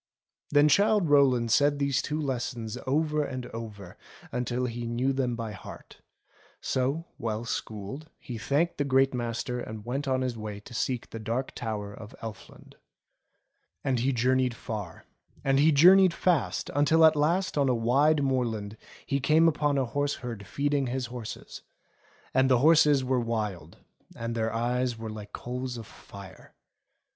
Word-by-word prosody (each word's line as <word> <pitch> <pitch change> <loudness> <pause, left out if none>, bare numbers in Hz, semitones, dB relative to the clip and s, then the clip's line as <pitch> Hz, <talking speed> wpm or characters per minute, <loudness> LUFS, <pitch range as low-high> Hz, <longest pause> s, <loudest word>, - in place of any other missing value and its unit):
Then 145 0 +5
Childe 200 +1 +3
Rowland 130 -5 +4
said 145 +4 +4
these 140 -2 +1
two 155 +1 -3
lessons 125 -5 -3
over 150 +2 +1
and 130 -3 -5
over 105 -5 -8 0.3
until 125 +1 -1
he 120 -1 -4
knew 125 +4 0
them 130 -3 -1
by 115 -2 -5
heart; 95 - -11 0.6
so, 135 +6 -1
well 110 0 -3
schooled, 115 +7 -5
he 120 -3 -7
thanked 150 +9 0
the - - +3
Great 135 -1 +3
Master 120 0 -3
and 110 -3 -7
went 135 +4 -3
on 130 -1 +1
his 125 -2 -2
way 105 -2 -6
to 115 - -13
seek 125 0 -2
the 115 - -6
Dark 115 +4 -3
Tower 105 -3 -4
of 110 +1 -11
Elfland. 110 -2 -10 1.1
And 130 -3 +1
he 130 +4 +1
journeyed 125 0 +1
far, 105 -7 -7 0.4
and 135 0 +2
he 155 +3 +5
journeyed 180 +4 +7
fast, 175 -7 0
until 160 +3 +5
at 160 0 +6
last 175 +6 +1
on 140 -2 +2
a 125 - +2
wide 140 +6 +3
moorland 115 -6 -1 0.3
he 140 - 0
came 155 +4 +4
upon 145 -2 +1
a 135 - +1
horse 145 +4 -1
herd 115 -5 -7
feeding 140 +4 0
his 130 +1 -2
horses; 120 -3 -7 0.7
and 130 0 +3
the 130 - +5
horses 150 0 +5
were 130 0 +1
wild, 105 -9 -3 0.4
and 115 0 -4
their 115 -1 -1
eyes 120 +1 -1
were 110 -1 -6
like 105 -1 -9
coals 125 0 -5
of 115 - -8
fire. 100 -3 -13
125 Hz, 160 wpm, -28 LUFS, 115-145 Hz, 1.1 s, journeyed